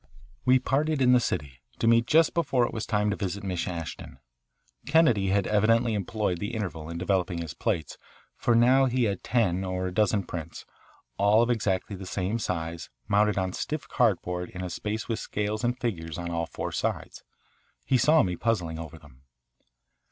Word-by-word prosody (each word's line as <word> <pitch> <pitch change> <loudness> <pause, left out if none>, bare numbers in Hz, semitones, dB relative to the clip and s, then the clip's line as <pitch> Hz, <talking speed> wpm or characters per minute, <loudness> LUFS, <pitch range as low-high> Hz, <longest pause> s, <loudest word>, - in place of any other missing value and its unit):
We 130 +1 +6
parted 145 +4 0
in 125 -1 +5
the 125 - +6
city, 70 - -3 0.2
to - - -1
meet 115 +1 +4
just 160 +2 +4
before 135 -7 +2
it - - -5
was 110 -2 -4
time 105 -1 +1
to - - -1
visit 100 +1 -4
Miss 90 -3 -2
Ashton. 85 -6 -6 0.7
Kennedy 140 -10 +4
had 100 0 +2
evidently 115 +2 +3
employed 105 -3 -1
the 105 +5 -4
interval 80 -7 -4
in 85 - -5
developing 90 0 0
his 85 -3 -5
plates, 80 - -2 0.4
for 120 - +1
he - - +5
now 130 +3 +5
had 120 -6 0
ten 95 -7 +1
or 95 -1 -2
a 90 - -3
dozen 105 0 +2
prints, 85 -2 -7 0.5
all 105 +3 +5
of 120 - +1
exactly 100 -3 -1
the 95 0 -8
same 95 +5 -2
size, 85 -5 -4 0.2
mounted 105 0 +2
on 95 -1 -1
stiff 155 -1 -4
cardboard 90 -6 0
in 90 - -7
a 90 - -4
space 105 +4 -4
with 115 - -2
scales 105 +2 -3
and 120 +1 0
figures 85 -11 -3
on 85 -1 -4
all 85 -1 -2
four - - -5
sides. - - -3 0.6
He 130 - +2
saw 155 +5 +5
me 90 -1 -1
puzzling 90 -7 -1
over 80 -1 -8
them. 70 -4 -18
100 Hz, 185 wpm, -27 LUFS, 90-115 Hz, 0.7 s, We